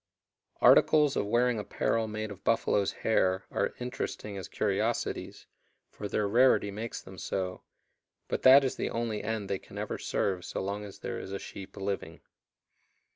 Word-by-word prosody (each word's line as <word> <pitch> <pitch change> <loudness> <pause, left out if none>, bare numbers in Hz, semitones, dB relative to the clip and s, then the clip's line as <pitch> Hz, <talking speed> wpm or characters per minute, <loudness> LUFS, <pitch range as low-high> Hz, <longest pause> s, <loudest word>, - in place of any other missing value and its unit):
Articles 150 -3 +6
of 100 - 0
wearing 120 +1 +2
apparel 110 +2 0
made 110 0 -4
of 100 - -10
buffalo's 100 -1 +2
hair 95 -4 +1
are - - -1
interesting 125 -4 -4
as 95 -3 -6
curiosities, - - -2 0.5
for 105 - -6
their 105 +1 0
rarity 115 -2 +4
makes 110 +3 -5
them 95 -1 -11
so, 90 -1 -3 0.7
but - - -2
that 135 +2 +8
is 130 - -1
the - - -1
only 115 -2 -2
end 110 -2 -2
they 95 -1 -2
can - - -13
ever - - -3
serve 95 -3 -1
so - - -4
long 100 +2 -3
as 100 - -10
there - - -5
is - - -7
a 100 - -2
sheep 95 -1 -9
living. 100 0 -4
105 Hz, 165 wpm, -30 LUFS, 100-115 Hz, 0.7 s, that